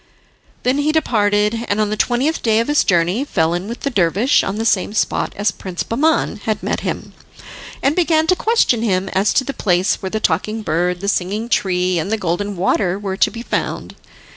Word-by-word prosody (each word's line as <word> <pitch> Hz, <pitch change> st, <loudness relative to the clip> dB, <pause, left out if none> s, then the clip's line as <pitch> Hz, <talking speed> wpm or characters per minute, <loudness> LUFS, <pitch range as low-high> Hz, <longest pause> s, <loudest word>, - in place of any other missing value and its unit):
Then 255 Hz, +3 st, +1 dB
he 295 Hz, +1 st, +2 dB
departed, 210 Hz, -6 st, +1 dB
and 205 Hz, -, 0 dB
on 210 Hz, -1 st, +1 dB
the -, -, 0 dB
twentieth 255 Hz, +8 st, 0 dB
day 225 Hz, -1 st, +2 dB
of 230 Hz, -, 0 dB
his 295 Hz, -, +3 dB
journey 180 Hz, +6 st, +1 dB
fell 165 Hz, -, 0 dB
in 175 Hz, +3 st, -3 dB
with 235 Hz, +2 st, -7 dB
the 280 Hz, -, -2 dB
dervish 200 Hz, -, +2 dB
on 195 Hz, -, -3 dB
the 225 Hz, +1 st, -2 dB
same 205 Hz, -2 st, +1 dB
spot -, -, 0 dB
as 205 Hz, +2 st, +1 dB
Prince 185 Hz, -2 st, -5 dB
Bahman 290 Hz, 0 st, +1 dB
had 215 Hz, -1 st, -2 dB
met -, -, -1 dB
him, -, -, -5 dB, 0.7 s
and 275 Hz, +3 st, +2 dB
began 320 Hz, -3 st, +2 dB
to 365 Hz, +3 st, +3 dB
question 435 Hz, -, +2 dB
him 190 Hz, -4 st, 0 dB
as 195 Hz, +3 st, +1 dB
to 265 Hz, -, +3 dB
the 275 Hz, -, -4 dB
place 185 Hz, -5 st, +1 dB
where 190 Hz, -, -3 dB
the 220 Hz, -, -2 dB
Talking 215 Hz, 0 st, -1 dB
Bird, 175 Hz, +1 st, -1 dB
the 200 Hz, -, -4 dB
Singing 205 Hz, +4 st, -1 dB
Tree 180 Hz, -4 st, +1 dB
and 165 Hz, +6 st, -3 dB
the 220 Hz, -, +1 dB
Golden 200 Hz, +2 st, -2 dB
Water 185 Hz, 0 st, +1 dB
were 195 Hz, -2 st, -4 dB
to -, -, +3 dB
be 230 Hz, 0 st, -8 dB
found. -, -, -3 dB
210 Hz, 210 wpm, -18 LUFS, 185-240 Hz, 0.7 s, his